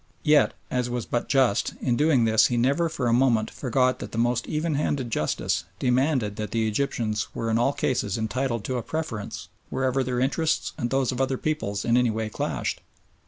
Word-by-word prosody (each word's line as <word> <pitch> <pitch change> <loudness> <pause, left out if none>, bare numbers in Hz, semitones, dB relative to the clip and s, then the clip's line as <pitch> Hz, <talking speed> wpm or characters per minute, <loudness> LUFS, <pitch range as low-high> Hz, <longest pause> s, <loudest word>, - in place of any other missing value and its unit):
Yet, 150 -3 +4 0.2
as 125 -1 0
was 120 -2 -3
but 120 - -2
just, 130 -7 +2
in 125 -3 +1
doing 140 -4 +3
this 110 -1 +5
he 120 - -1
never 140 +8 +2
for 140 -5 -3
a 115 - +3
moment 120 -3 +3
forgot 130 0 +1
that - - -7
the - - -6
most 120 +1 +1
even 155 +1 -1
handed 140 -4 -1
justice 75 - 0
demanded 125 -4 +1
that 105 -1 -3
the 110 -1 0
Egyptians 110 -2 -1
were 115 0 -2
in 110 - +2
all 130 +3 +3
cases 115 -7 -1
entitled 115 0 -1
to 130 - -2
a - - -1
preference 115 -5 -5 0.2
wherever 130 0 0
their 125 -1 -2
interests 155 +5 0
and 120 -4 -2
those 135 -1 +1
of 130 +1 -2
other 135 0 0
peoples 105 -11 -2
in 120 +1 +3
any 125 -1 +3
way 110 0 -2
clashed. - - -3
125 Hz, 200 wpm, -25 LUFS, 115-135 Hz, 0.2 s, this